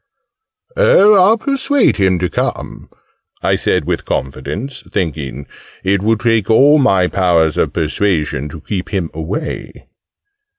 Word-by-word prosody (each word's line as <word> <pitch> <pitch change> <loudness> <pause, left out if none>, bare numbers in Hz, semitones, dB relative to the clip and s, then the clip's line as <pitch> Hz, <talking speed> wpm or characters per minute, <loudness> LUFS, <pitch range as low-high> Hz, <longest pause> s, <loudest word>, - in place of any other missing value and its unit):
"Oh, 215 - +5
I'll 200 +3 +5
persuade 275 +2 +1
him 95 -2 +2
to 90 +1 -1
come!" - - -4 0.5
I - - +2
said - - 0
with - - -2
confidence 75 - -5
thinking 70 -6 -4 0.4
"it 95 0 +1
would 110 +1 0
take 115 -3 +1
all 145 +7 +5
my 95 -9 +3
powers 85 -4 +1
of 80 -5 0
persuasion 80 -4 -1
to 80 +1 -10
keep 95 +1 -5
him 95 -5 -3
away!" 85 - -6
95 Hz, 130 wpm, -16 LUFS, 80-135 Hz, 0.5 s, Oh